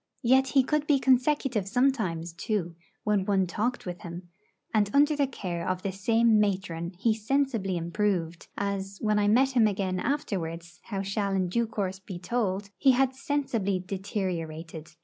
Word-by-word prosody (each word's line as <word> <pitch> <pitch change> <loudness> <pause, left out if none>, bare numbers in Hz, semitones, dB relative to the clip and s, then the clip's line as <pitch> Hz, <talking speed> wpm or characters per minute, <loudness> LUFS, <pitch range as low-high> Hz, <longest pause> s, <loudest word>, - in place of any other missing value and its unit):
Yet 260 +2 +4
he 265 - +7
could 300 +2 0
be 290 - +5
consecutive 260 -4 +2
sometimes, 195 -9 0
too, 175 -2 -2 0.3
when 210 -2 +2
one 195 -1 +2
talked 215 +8 -2
with 175 -1 -6
him; 175 +1 -8 0.4
and 210 -2 +3
under 295 +2 +5
the 285 -1 +2
care 180 -9 -4
of 185 0 -2
the 195 - -1
same 225 +3 +3
matron 185 -4 -1
he 220 +4 +2
sensibly 225 -4 0
improved, 170 -1 -1
as, 195 -1 -3
when 215 -1 +1
I 205 - +2
met 260 +6 +4
him 235 -4 +4
again 190 -2 -1
afterwards 170 - -3
how 195 -3 -3
shall 200 0 -1
in 185 -2 0
due 235 +5 +1
course 195 -3 -3
be 190 -2 -8
told 200 0 -2
he 270 -2 +5
had 265 +1 +2
sensibly 255 -8 -1
deteriorated. 175 -4 -4
200 Hz, 165 wpm, -28 LUFS, 185-240 Hz, 0.4 s, he